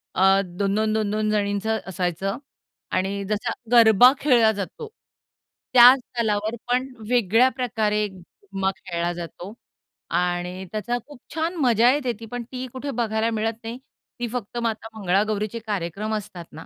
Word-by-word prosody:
अ, 185 - +2 0.2
दोन, 195 +3 -2
दोन, 215 0 +1
दोन, 215 -2 0
दोन 215 0 0
जणींचं 205 +1 0
असायचं 185 +1 -2 0.5
आणि 195 +2 -1
जसा 215 +2 -1 0.2
गरबा 235 +1 +7
खेळला 240 -6 +4
जातो, 205 - -6 0.9
त्या 245 +1 +10
स्थलावर 220 -3 -2
पण 250 +2 +1 0.2
वेगळ्या 240 +1 +4
प्रकारे 215 -4 0
झूम्मा 190 +1 -5
खेळला 175 -2 -3
जातो 175 +3 -8 0.7
आणि 180 +1 -2
त्याचा 230 +3 -2
खूप 290 -4 -13 0.2
छान 325 +3 -1
मजा 235 0 +5
येते. 270 -4 0
ती 225 - -8
पण 245 +2 -5
ती 255 0 -4
कुठे 275 +2 -4
बघायला 225 -2 0
मिळत 225 0 -1
नाही. 230 +2 -5 0.4
ती 240 - -2
फक्त 240 -1 -5
माता 225 -1 -2
मंगळागौरीचे 210 +3 0
कार्यक्रम 205 +2 -3
असतात 180 -5 -7
ना, 160 - -10
215 Hz, 145 wpm, -23 LUFS, 195-240 Hz, 0.9 s, त्या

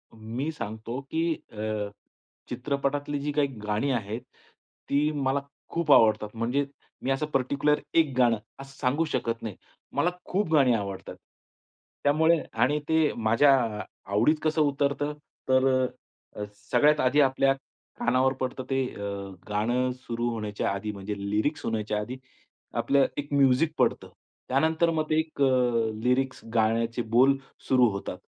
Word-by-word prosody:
मी 115 +7 -4
सांगतो, 110 -3 -5
की 160 +4 -1 0.2
अ, 105 -1 -3 0.6
चित्रपटातली 140 +3 -2
जी 145 +1 -2
काही 145 -1 +2 0.2
गाणी 105 +7 0
आहेत, 110 -1 -2 0.7
ती 145 +2 +2
मला 140 -2 0 0.3
खूप 170 -3 0
आवडतात. 110 -4 +5
म्हणजे 120 +5 0 0.4
मी 135 - 0
असं 135 +3 0
पर्टिक्युलर 140 +3 +1
एक 160 -4 +3
गाणं, 120 -3 +4 0.2
असं 135 0 -11
सांगू 140 +5 +1
शकत 115 -6 -2
नाही. 105 -4 -5 0.4
मला 175 - +2 0.2
खूप 195 -2 -1
गाणी 135 -5 +5
आवडतात. 100 -3 -4 0.9
त्यामुळे 160 +3 +4
आणि 125 +7 +2
ते 160 -1 +3
माझ्या 115 +5 +4 0.2
अ, - - -3 0.3
आवडीत 115 +10 +4
कसं 155 0 +2
उतरतं? 145 0 +1 0.4
तर 130 0 +4 0.7
अ, 105 - -4 0.3
सगळ्यात 150 +1 +4
आधी 135 +4 +4
आपल्या 135 0 +3 0.5
कानावर 130 +2 +2
पडतं 130 0 -2
ते 135 -1 +1
अ, 100 0 -4 0.4
गाणं 120 +5 +1
सुरू 120 -2 -3
होण्याच्या 105 -3 -2
आधी 100 +2 -3
म्हणजे 100 +1 -5
लिरिक्स 145 +9 0
होण्याच्या 110 -1 -1
आधी, 120 +5 -5 0.6
आपलं 140 -1 +3
एक 145 0 -4
म्युझिक 140 +3 +4
पडतं. - - +1 0.4
त्यानंतर 160 +5 +2
मग 155 -1 0
ते 155 - +3
एक 160 -2 -4
अ, - - +6 0.6
लिरिक्स 130 +1 +1
गाण्याचे 115 +1 +1
बोल 135 +3 +6 0.3
सुरू 125 -2 +5
होतात. 100 0 -5
130 Hz, 140 wpm, -27 LUFS, 115-145 Hz, 0.9 s, अ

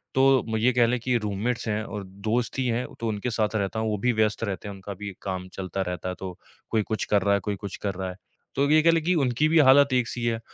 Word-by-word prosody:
तो 135 -1 +5
म 110 - 0
ये 115 +4 +3
कह 120 -1 +4
लें 125 +1 0
कि 125 +1 0
रूममेट्स 110 +3 -2
हैं 105 0 -1
और 105 -2 -6
दोस्त 110 +7 -2
ही 130 - +1
हैं, 120 +2 0
तो 115 - -2
उनके 110 +3 -2
साथ 110 -1 0
रहता 100 +1 -1
हूँ, 110 - 0
वो 105 - -1
भी 125 +3 +2
व्यस्त 110 0 +1
रहते 100 0 -3
हैं। 100 - -5
उनका 95 +1 -7
भी 100 -1 -5
काम 95 -1 -4
चलता 95 0 -4
रहता 90 +1 -3
है, 90 - -4
तो 95 -2 -6 0.3
कोई 110 - +3
कुछ 110 +1 -2
कर 105 -1 +2
रहा 100 +1 +2
है, 100 - +3
कोई 105 - 0
कुछ 100 -1 -7
कर 100 - 0
रहा 95 0 -3
है, 90 - -7 0.4
तो 140 +1 +2
ये 155 0 +6
कह 165 - +5
लें 165 -1 +1
कि 180 +3 +2
उनकी 135 0 +2
भी 165 - +5
हालत 140 -1 +6
एक 125 -2 +2
सी 120 0 -4
है। 115 -1 0
110 Hz, 285 wpm, -26 LUFS, 100-125 Hz, 0.4 s, ये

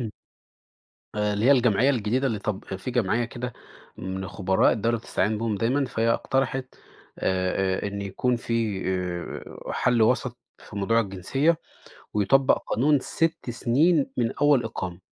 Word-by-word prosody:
إمم. 115 -3 -3 1.0
آآ 105 0 0
اللي 105 +2 -1
هي 140 - +7
الجمعية 125 0 +4
الجديدة 125 +1 0
اللي 110 -5 -1
طب 100 -1 -4
في 95 +7 -5
جمعية 120 -1 +1
كده 120 +1 -6 0.4
من 95 0 -5
خبراء 95 0 +2
الدولة 115 +2 0
بتستعين 105 -1 -1
بيهم 115 -1 -1
دايمًا، 130 +7 +1
فهي 115 -2 0
اقترحت 130 +1 -1 0.4
آآ، 95 +1 0
آآ - - 0
إن 100 0 -4
يكون 120 +6 0
في 115 -4 -1
آآ، 90 -2 -4
حل 120 -3 +2
وسط 125 +1 +1 0.2
في 105 - -12
موضوع 115 +3 +2
الجنسية، 115 - 0 0.6
ويطبق 130 +6 +4
قانون 140 +5 +3
6 165 -2 -1
سنين 135 +5 +2
من 115 -2 +1
أول 145 -4 +3
إقامة، 95 -5 -5
115 Hz, 145 wpm, -25 LUFS, 100-130 Hz, 1.0 s, هي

